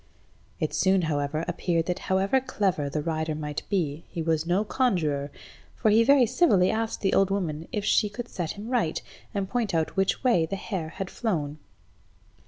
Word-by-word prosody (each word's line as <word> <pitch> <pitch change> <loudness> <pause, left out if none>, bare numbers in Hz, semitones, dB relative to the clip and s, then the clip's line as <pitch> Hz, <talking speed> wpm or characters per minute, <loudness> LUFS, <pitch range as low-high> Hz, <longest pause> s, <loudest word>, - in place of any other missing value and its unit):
It - - -1
soon, 190 -1 +3
however, 155 0 -1
appeared 165 -2 0
that 180 +1 -2
however 195 +7 +3
clever 195 - -1
the 150 +1 -2
rider 160 -1 -1
might 150 -1 -4
be, 165 -6 -1
he - - -6
was 160 0 0
no 185 +4 +2
conjuror, 160 - 0 0.5
for 215 - +2
he 225 +2 +6
very 275 0 +6
civilly 225 - +3
asked 225 0 -2
the 195 - +1
old 195 -1 +4
woman 165 -5 -2
if 210 -1 -2
she 210 - +3
could 240 +4 -6
set 170 -7 -4
him 210 +3 -8
right, 225 -11 +1 0.3
and 195 -1 -2
point 225 -5 -1
out 160 -1 0
which 195 +4 +1
way 205 -11 +3
the 195 - -3
hare 175 -5 -5
was 195 -1 -3
flown. 155 -10 -2
190 Hz, 185 wpm, -27 LUFS, 160-210 Hz, 0.5 s, he